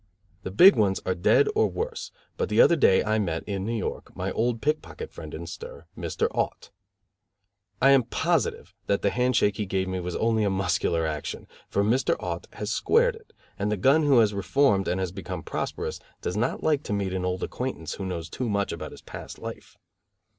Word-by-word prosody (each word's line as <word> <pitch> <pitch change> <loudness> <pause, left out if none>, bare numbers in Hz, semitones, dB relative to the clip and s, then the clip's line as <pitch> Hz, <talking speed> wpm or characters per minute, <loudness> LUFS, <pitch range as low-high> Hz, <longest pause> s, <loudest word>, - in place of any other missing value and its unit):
The 95 - -5
big 160 - +8
ones 100 -4 +2
are 95 - +1
dead 90 - +4
or 440 +1 +3
worse, 460 +1 -4 0.2
but 470 -1 -2
the - - +1
other 170 - +7
day 95 - +4
I 110 0 +1
met, 85 -6 -1
in 100 -2 -3
New 115 - -1
York, 105 - -5
my - - -3
old 115 0 0
pickpocket 155 - -3
friend - - -9
in - - -6
stir, 485 +1 -9
Mr. 455 - -1
Aut. - - -3 1.1
I 135 +2 +6
am 135 -3 +5
positive - - -1
that 100 - +1
the 100 - +3
hand 125 0 +1
shake 105 -3 +2
he 105 - -2
gave 95 0 -1
me 95 0 -2
was 90 0 -4
only 110 -1 +1
a 100 - +2
muscular 85 -3 0
action, 75 -2 -4 0.2
for 100 - +1
Mr. 120 +6 +2
Aut - - -4
has - - -4
"squared 480 +1 +3
it", 450 0 -17 0.3
and 105 +1 0
the 105 - 0
gun 135 +11 +4
who 145 -4 +4
has 110 -3 +4
reformed 100 0 +2
and 90 - 0
has 95 -2 -2
become - - -6
prosperous - - -4 0.2
does 90 - -3
not 110 +3 -1
like 150 -3 +2
to - - -2
meet 100 -2 -1
an 95 -1 -2
old 90 0 -2
acquaintance, 125 - -4
who 95 - -5
knows 85 -3 -4
too 120 +8 -4
much 100 -1 0
about - - -5
his - - -13
past - - -9
life. - - -9
105 Hz, 210 wpm, -26 LUFS, 95-135 Hz, 1.1 s, big